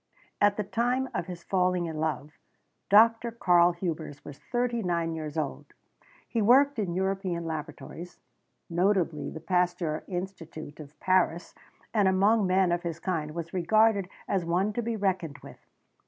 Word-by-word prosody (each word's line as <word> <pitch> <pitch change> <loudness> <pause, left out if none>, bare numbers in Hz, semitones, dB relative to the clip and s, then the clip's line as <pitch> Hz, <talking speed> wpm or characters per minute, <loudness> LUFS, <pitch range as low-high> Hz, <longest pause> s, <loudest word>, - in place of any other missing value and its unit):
At 205 0 +4
the 210 - 0
time 245 +6 0
of 170 - -3
his 175 -2 -8
falling 180 -2 +1
in 160 -2 -5
love, 155 -1 -2 0.6
Dr. 225 +3 +5
Karl 175 -6 +4
Hubers 165 -4 -5
was 140 - -10
thirty 240 -1 -1
nine 170 -3 -1
years 155 -1 -5
old. 150 -3 -4 0.5
He 230 - -2
had 210 - +1
worked 275 +1 +5
in 180 -5 -2
European 190 -2 -1
laboratories, 165 +2 -7 0.5
notably 175 -2 +1
the 160 - -8
Pasteur 175 -2 0
Institute 170 -5 -6
of 150 -1 -12
Paris, 180 -2 +1 0.4
and 205 -3 +3
among 200 +2 +3
men 185 -1 +3
of 175 0 0
his 170 -2 -4
kind 160 -4 -3
was 170 0 -5
regarded 200 +2 +3 0.2
as 190 -3 0
one 180 +5 0
to 240 - -1
be 230 0 -2
reckoned 185 -8 -1
with. - - -12
180 Hz, 155 wpm, -28 LUFS, 165-205 Hz, 0.6 s, Dr